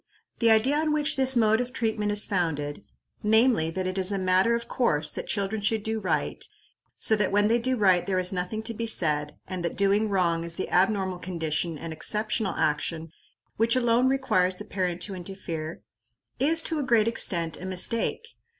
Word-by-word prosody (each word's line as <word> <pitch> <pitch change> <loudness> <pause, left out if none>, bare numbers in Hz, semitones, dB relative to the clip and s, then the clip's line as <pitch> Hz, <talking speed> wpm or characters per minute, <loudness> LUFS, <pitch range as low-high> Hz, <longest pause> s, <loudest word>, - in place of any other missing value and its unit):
The 230 - +3
idea 225 +6 +3
on 310 -1 0
which 300 -1 +1
this 265 -1 +3
mode 220 0 +3
of 250 0 -5
treatment 220 -4 -1
is 205 0 +3
founded 160 -4 -2 0.4
namely, 220 -5 +3
that 185 +3 -3
it 185 +1 -2
is 190 +1 +3
a 200 - 0
matter 185 +4 +2
of 235 0 -5
course 150 - +1
that - - -6
children 205 +1 -2
should 210 +1 0
do 220 0 -2
right, - - -2 0.5
so 220 - +4
that 210 -2 0
when 205 +1 +2
they 235 +1 +3
do 255 +2 0
right 185 -5 +3
there 190 -1 0
is 185 +1 0
nothing 185 +4 -3
to 230 +1 -1
be 230 +1 -4
said, 150 -7 +1
and 185 -2 -5
that 170 - -3
doing 200 +2 +2
wrong 170 -4 0
is 170 0 -4
the 190 - -4
abnormal 190 -1 +1
condition 165 -2 -3
and 165 +1 -7
exceptional 210 +4 -1
action 160 +2 -2 0.5
which 230 +2 +2
alone 240 0 +2
requires 190 -9 +1
the 210 - -10
parent 180 -4 -3
to 200 - -5
interfere 170 -4 -7 0.6
is, 325 +4 +4
to 320 - -2
a - - -1
great 230 -4 +2
extent, 170 -8 0
a - - -6
mistake. 225 - -1
200 Hz, 195 wpm, -26 LUFS, 180-230 Hz, 0.6 s, so